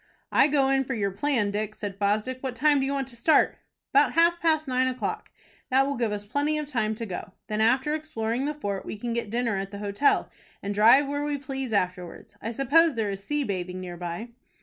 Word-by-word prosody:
"I - - +5
go 275 -2 +2
in 270 0 +3
for 260 0 -3
your 200 -3 -1
plan, 210 -1 0
Dick," 215 +1 -3
said 200 -2 -6
Fosdick. 210 +5 0
"What 260 -2 -4
time 290 +3 +3
do 270 - 0
you - - -1
want 275 -2 -2
to 240 - -8
start?" 270 +7 +3 0.3
"About 280 +2 +4
half 340 +1 +4
past 315 -2 +2
nine 255 0 +2
o'clock. 255 0 -3 0.4
That 265 +1 +4
will 280 - -1
give 235 -3 -1
us 205 0 -4
plenty 290 +7 0
of 300 -1 -3
time 220 -6 -1
to 230 +1 -5
go. 185 -1 -6
Then, 215 0 -2
after 260 +6 +3
exploring 260 -5 -2
the 300 - -2
fort, 200 -9 -3
we - - -6
can 235 +2 -3
get 235 -2 -3
dinner 230 -2 0
at 195 0 -4
the 200 - -8
hotel, 205 +7 +1 0.3
and 200 +1 -2
drive 235 +7 +6
where 285 +1 -2
we 295 -1 -1
please 270 -2 -5
afterwards. 180 -4 -3
I 225 - -3
suppose 280 +6 +3
there 215 -3 -1
is 195 0 -6
sea 295 +5 -1
bathing 185 -4 -4
near 180 -1 -6
by." 175 +6 -5
240 Hz, 230 wpm, -26 LUFS, 205-280 Hz, 0.4 s, drive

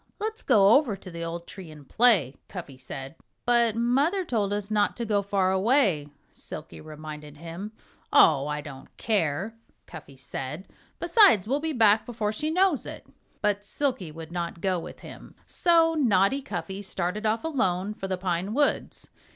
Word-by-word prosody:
"Let's 440 +1 -3
go 205 -6 +5
over 255 -4 +4
to 190 -1 -11
the 170 0 -6
old 170 +1 -5
tree 185 -4 -10
and 150 -3 -13
play," 210 - +3
Cuffy 170 -8 -8
said. 135 +1 -7 0.3
"But 235 -2 +3
Mother 280 - +1
told 210 -8 -1
us 205 0 -3
not 210 -1 +1
to 235 - -3
go 205 -2 +1
far 195 -1 +1
away," 190 - +2 0.2
Silkie 155 - -8
reminded 150 -1 -9
him. 170 +6 -7 0.4
"Oh! 145 -3 +5
I 150 0 -3
don't 140 -3 -10
care," 195 -1 0 0.3
Cuffy 145 -4 -12
said. 135 +6 -6 0.3
"Besides, 345 - +5
we'll 275 +4 +1
be 320 +1 -2
back 220 -5 +4
before 220 -3 -2
she 305 +8 -2
knows 360 -3 +2
it." - - -8 0.4
But 205 -1 +1
Silkie 250 - -2
would 160 +1 -10
not 170 -1 -4
go 185 0 0
with - - -10
him. - - -12
So 330 -2 +3
naughty 245 -3 +2
Cuffy 195 -5 -5
started 195 +2 -2
off 220 +1 0
alone 210 - 0
for 195 - -6
the 190 -1 -2
pine 185 +3 -2
woods. 290 0 0
200 Hz, 165 wpm, -26 LUFS, 170-240 Hz, 0.4 s, go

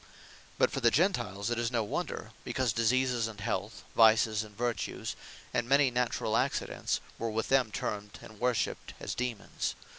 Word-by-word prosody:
But - - +4
for - - -2
the - - +5
Gentiles, 100 +3 +1
'tis 120 0 0
no 120 -3 +1
wonder; 105 - -3
because 130 -4 0
Diseases, 120 +1 +2
and 110 -2 -8
Health; 100 +2 -3
Vices, 110 -1 +5
and 105 -1 -13
Vertues; 120 0 -2 0.4
and 120 0 0
many 140 -1 +5
naturall 125 0 +1
accidents, - - 0 0.2
were 115 - -1
with 110 +1 -2
them 130 -4 +4
termed, 105 0 -4
and 110 -2 -13
worshipped 125 -1 -1
as - - -3
Daemons. 125 -4 -3
115 Hz, 155 wpm, -31 LUFS, 110-125 Hz, 0.4 s, the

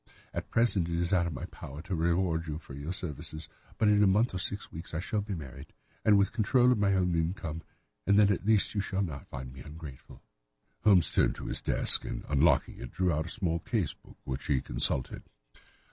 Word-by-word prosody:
At - - -5
present 105 -7 +2
it 85 - -1
is 85 +2 0
out 90 -2 +3
of 85 - -4
my - - -5
power 70 +4 -9
to 95 - -5
reward 85 0 +1
you 75 -1 -3
for 80 - -11
your 70 +5 -5
services, 80 -2 -6 0.3
but 110 - +2
in 105 0 +5
a 105 - +6
month 105 +5 +3
or 95 - -2
six 100 +2 -5
weeks 80 0 -8
I - - -1
shall 105 +4 -1
be 100 -1 -4
married, 70 -7 -10 0.3
with 100 -2 +5
the - - -15
control 120 +3 +3
of 120 - +2
my 100 -1 +3
own 90 -2 +1
income, 80 -1 -2 0.5
and 100 0 +5
then 105 -1 +6
at 95 - -1
least 110 -1 +3
you 100 - 0
shall 95 0 -1
not 75 -7 -6
find 65 0 -7
me 65 - -12
ungrateful." 75 -2 -11 0.6
Holmes 95 -6 +5
turned - - +2
to - - -8
his - - -2
desk - - +4
and, - - -5
unlocking 75 0 +2
it, - - -7
drew 90 -1 +1
out 80 +2 -1
a - - -7
small 85 -7 -1
case 95 - -1
book, - - -19
which 65 0 -5
he 70 -3 +2
consulted. 65 0 -1
85 Hz, 220 wpm, -30 LUFS, 75-100 Hz, 0.6 s, a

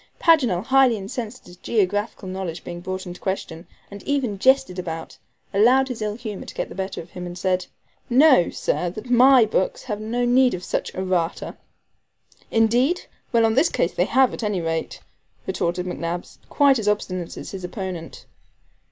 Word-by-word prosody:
Paganel, 250 - +3
highly 260 -2 +4
incensed 220 +4 -6
at - - -27
his 180 0 -14
geographical 205 0 -1
knowledge 185 -3 -5
being 175 0 -7
brought 185 +1 -5
in 175 - -6
question, 180 -2 -5 0.2
and 200 0 -9
even 255 -8 -1
jested 260 -6 +3
about, 165 -2 -6 0.4
allowed 250 +7 +4
his 245 -3 -5
ill 210 -1 -2
humor 215 -4 -7
to - - -9
get - - -3
the - - -8
better 190 +1 -4
of 170 - -15
him, 180 -1 -6
and 175 0 -8
said: 185 0 0 0.4
"Know, 260 - +6
sir, 180 - -1
that 215 +7 -8
my 250 0 +7
books 190 -3 -1
have 215 -4 -4
no 240 +3 -1
need 250 -2 +4
of 180 - -8
such - - -3
ERRATA." 185 -2 -1 0.9
"Indeed! 240 +9 +2 0.3
Well, 230 -1 +4
on 220 - +2
this 280 +8 +3
occasion - - 0
they - - +2
have, 265 -1 +3
at - - -6
any 210 -4 -1
rate," 165 -1 -3 0.4
retorted 175 +1 -1
McNabbs, 175 -1 -5
quite 280 -3 +4
as 210 - -4
obstinate 185 -4 -2
as - - -7
his 190 -2 -7
opponent. 180 -3 -6
205 Hz, 180 wpm, -23 LUFS, 180-245 Hz, 0.9 s, my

